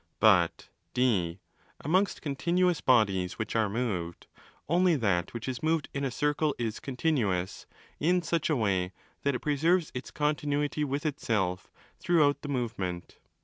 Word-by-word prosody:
But -, -, +3 dB, 0.3 s
(d) 100 Hz, -9 st, +1 dB, 0.4 s
amongst 185 Hz, +7 st, +1 dB
continuous 170 Hz, +4 st, +1 dB
bodies 100 Hz, -8 st, +2 dB
which 110 Hz, -, -4 dB
are 110 Hz, -2 st, +2 dB
moved, 100 Hz, -7 st, -3 dB, 0.4 s
only 175 Hz, +1 st, +3 dB
that 100 Hz, -, 0 dB
which 115 Hz, 0 st, -6 dB
is 130 Hz, -1 st, -3 dB
moved 160 Hz, -1 st, 0 dB
in 140 Hz, -, -2 dB
a 135 Hz, -, 0 dB
circle 150 Hz, +3 st, 0 dB
is 115 Hz, -3 st, -3 dB
'continuous' 125 Hz, -, -1 dB, 0.3 s
in 175 Hz, +3 st, +2 dB
such 165 Hz, -1 st, 0 dB
a 155 Hz, -, +3 dB
way 95 Hz, -6 st, 0 dB, 0.3 s
that 140 Hz, -1 st, +1 dB
it -, -, -4 dB
preserves 160 Hz, +4 st, +2 dB
its 125 Hz, -, -6 dB
continuity 150 Hz, 0 st, 0 dB
with 145 Hz, +1 st, -2 dB
itself 105 Hz, -11 st, -1 dB, 0.3 s
throughout 150 Hz, -5 st, +3 dB
the 145 Hz, -, -6 dB
movement. 110 Hz, -9 st, -3 dB
135 Hz, 145 wpm, -29 LUFS, 105-155 Hz, 0.4 s, But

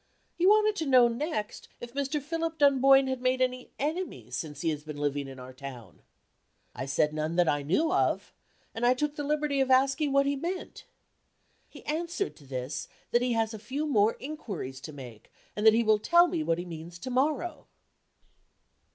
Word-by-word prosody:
He 355 Hz, -, +1 dB
wanted 425 Hz, +1 st, +5 dB
to 320 Hz, -, -2 dB
know, 250 Hz, -2 st, +7 dB
next, 235 Hz, -3 st, -4 dB
if 240 Hz, 0 st, -9 dB
Mr. 280 Hz, +2 st, -1 dB
Philip 325 Hz, +2 st, -3 dB
Dunboyne 275 Hz, -2 st, +5 dB
had 260 Hz, -1 st, -3 dB
made 255 Hz, 0 st, +1 dB
any 255 Hz, 0 st, -1 dB
enemies 285 Hz, -, -3 dB
since 150 Hz, -1 st, -5 dB
he 165 Hz, -, +1 dB
has 150 Hz, -2 st, -3 dB
been 150 Hz, -1 st, -7 dB
living 145 Hz, -1 st, -1 dB
in 135 Hz, -1 st, -10 dB
our 130 Hz, 0 st, -10 dB
town. 130 Hz, -3 st, -10 dB, 0.7 s
I 130 Hz, -, -5 dB
said 150 Hz, +2 st, +1 dB
none 155 Hz, +2 st, -2 dB
that 175 Hz, -1 st, +3 dB
I 145 Hz, -1 st, +1 dB
knew 300 Hz, -, +1 dB
of 375 Hz, -, 0 dB, 0.4 s
and 225 Hz, -, -5 dB
I 245 Hz, +1 st, +5 dB
took 295 Hz, +2 st, -2 dB
the 290 Hz, -, -4 dB
liberty 295 Hz, -1 st, 0 dB
of 265 Hz, -, +1 dB
asking 270 Hz, +3 st, +3 dB
what 275 Hz, 0 st, +4 dB
he 280 Hz, 0 st, +1 dB
meant. 350 Hz, +6 st, -5 dB, 0.8 s
He -, -, -14 dB
answered 340 Hz, +5 st, -2 dB
to 145 Hz, -, -17 dB
this, 130 Hz, +1 st, -4 dB, 0.2 s
that 240 Hz, -, +3 dB
he 250 Hz, -1 st, +1 dB
has 225 Hz, -1 st, 0 dB
a 220 Hz, -, -7 dB
few 265 Hz, +8 st, -3 dB
more 225 Hz, -7 st, +2 dB
inquiries 205 Hz, -, -6 dB
to 155 Hz, -, -8 dB
make, 125 Hz, -7 st, -11 dB, 0.2 s
and 210 Hz, +1 st, +2 dB
that 220 Hz, -, +9 dB
he 235 Hz, -, +3 dB
will 215 Hz, -1 st, +4 dB
tell 345 Hz, +10 st, +5 dB
me 345 Hz, -2 st, -2 dB
what 165 Hz, -, 0 dB
he 175 Hz, -, -5 dB
means 170 Hz, 0 st, -8 dB
to 255 Hz, +9 st, -6 dB
morrow. 300 Hz, +7 st, -1 dB
250 Hz, 195 wpm, -29 LUFS, -, 0.8 s, that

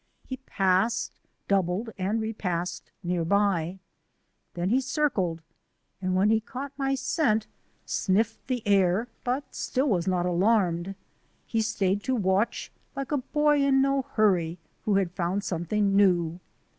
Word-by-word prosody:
He 260 Hz, -, -5 dB
passed, 195 Hz, -2 st, 0 dB, 0.3 s
doubled, 195 Hz, +3 st, 0 dB
and 200 Hz, +3 st, -1 dB
repassed 185 Hz, -6 st, -3 dB
near 175 Hz, -1 st, 0 dB
by. 190 Hz, -1 st, +1 dB, 0.8 s
Then 175 Hz, +3 st, -1 dB
he 260 Hz, +3 st, +3 dB
circled, 200 Hz, -, 0 dB, 0.6 s
and 185 Hz, -1 st, 0 dB
when 200 Hz, +3 st, +4 dB
he 220 Hz, -, +4 dB
caught 260 Hz, +5 st, -7 dB
my 270 Hz, -1 st, 0 dB
scent, 225 Hz, -6 st, +1 dB, 0.4 s
sniffed 215 Hz, +4 st, 0 dB
the 250 Hz, -3 st, -2 dB
air 200 Hz, +3 st, +3 dB
but 255 Hz, +3 st, -2 dB
still 265 Hz, +3 st, -1 dB
was 180 Hz, -5 st, +1 dB
not 180 Hz, -1 st, +1 dB
alarmed. 180 Hz, -1 st, +1 dB, 0.5 s
He 225 Hz, -, 0 dB
stayed 205 Hz, -3 st, 0 dB
to 260 Hz, -, +1 dB
watch, 195 Hz, 0 st, 0 dB, 0.2 s
like 275 Hz, 0 st, -4 dB
a 295 Hz, -, +2 dB
boy 295 Hz, +2 st, +2 dB
in 270 Hz, -1 st, +4 dB
no 275 Hz, 0 st, +2 dB
hurry 180 Hz, -6 st, +2 dB, 0.3 s
who 210 Hz, -, +2 dB
had 190 Hz, -3 st, +1 dB
found 180 Hz, +3 st, -1 dB
something 195 Hz, +3 st, 0 dB
new. 175 Hz, -4 st, +3 dB
200 Hz, 140 wpm, -27 LUFS, 180-245 Hz, 0.8 s, when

